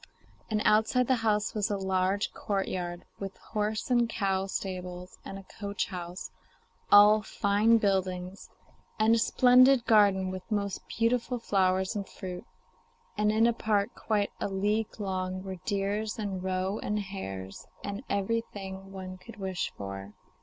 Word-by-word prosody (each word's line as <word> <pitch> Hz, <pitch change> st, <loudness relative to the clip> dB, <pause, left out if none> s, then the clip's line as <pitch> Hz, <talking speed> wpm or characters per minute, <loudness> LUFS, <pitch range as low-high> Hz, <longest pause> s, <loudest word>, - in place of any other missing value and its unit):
And 215 Hz, -1 st, 0 dB
outside 220 Hz, +4 st, +4 dB
the 260 Hz, +1 st, +2 dB
house 210 Hz, -2 st, +1 dB
was 210 Hz, -2 st, 0 dB
a 205 Hz, -, 0 dB
large 190 Hz, +1 st, 0 dB
courtyard 180 Hz, -3 st, -3 dB
with 195 Hz, -1 st, -6 dB
horse 215 Hz, +3 st, -3 dB
and 240 Hz, -1 st, +3 dB
cow 195 Hz, -3 st, 0 dB
stables 180 Hz, -1 st, -5 dB
and 195 Hz, -, -7 dB
a 195 Hz, -, -10 dB, 0.2 s
coach 200 Hz, +2 st, -2 dB
house 180 Hz, -1 st, -6 dB, 0.6 s
all 210 Hz, +1 st, +8 dB
fine 210 Hz, +3 st, +3 dB
buildings; 190 Hz, -2 st, -1 dB, 0.5 s
and 220 Hz, +1 st, +4 dB
a 230 Hz, -, +4 dB
splendid 255 Hz, +1 st, +5 dB
garden 200 Hz, -4 st, +4 dB
with 185 Hz, 0 st, -5 dB
most 200 Hz, -2 st, -1 dB
beautiful 240 Hz, +2 st, 0 dB
flowers 190 Hz, -2 st, +1 dB
and 200 Hz, -2 st, -4 dB
fruit, 180 Hz, -1 st, -7 dB, 0.7 s
and 210 Hz, 0 st, +2 dB
in 220 Hz, +1 st, +4 dB
a 235 Hz, -, +4 dB
park 215 Hz, -1 st, 0 dB
quite 210 Hz, -2 st, -1 dB
a -, -, -1 dB
league 210 Hz, +3 st, -1 dB
long 185 Hz, -2 st, -2 dB
were 190 Hz, -1 st, -6 dB
deer 200 Hz, +1 st, 0 dB
and 200 Hz, -4 st, -3 dB
roe 190 Hz, +2 st, -1 dB
and 210 Hz, -, -1 dB
hares, 95 Hz, -, -7 dB, 0.2 s
and 200 Hz, +2 st, -4 dB
everything 195 Hz, -2 st, -3 dB
one 185 Hz, -1 st, -7 dB
could 230 Hz, +5 st, -12 dB
wish 190 Hz, -2 st, -3 dB
for. 100 Hz, 0 st, -7 dB
200 Hz, 145 wpm, -29 LUFS, 185-215 Hz, 0.7 s, all